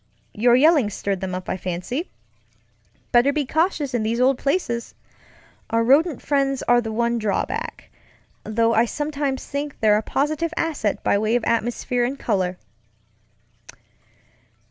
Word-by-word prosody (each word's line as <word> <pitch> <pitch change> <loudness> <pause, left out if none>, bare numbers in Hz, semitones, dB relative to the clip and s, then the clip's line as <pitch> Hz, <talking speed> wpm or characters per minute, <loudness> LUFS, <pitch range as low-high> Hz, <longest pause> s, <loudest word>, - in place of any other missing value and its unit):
Your 240 +3 +4
yelling 290 -4 +4
stirred 200 -2 -3
them 185 -1 -3
up, 185 - -6
I - - -2
fancy. 185 - -4 1.0
Better 245 +3 +5
be 290 -1 -1
cautious 310 -2 0
in 240 - 0
these 225 +2 -1
old 260 +1 +3
placesŌĆöour 275 -6 -2 0.8
rodent 270 +7 +3
friends 275 -2 0
are 240 0 +4
the 220 -1 -5
one 235 +1 0
drawback, 210 -3 -3 0.5
though 230 +1 +1
I 225 +1 +4
sometimes 285 0 -3
think 285 0 -5
they're 210 -1 +4
a - - 0
positive 310 +7 -1
asset 295 -11 -1
by 200 - +2
way 215 +2 +1
of 245 - 0
atmosphere 240 +1 0
and 260 +3 -2
color." 185 -7 -1
240 Hz, 140 wpm, -22 LUFS, 220-285 Hz, 1.0 s, Better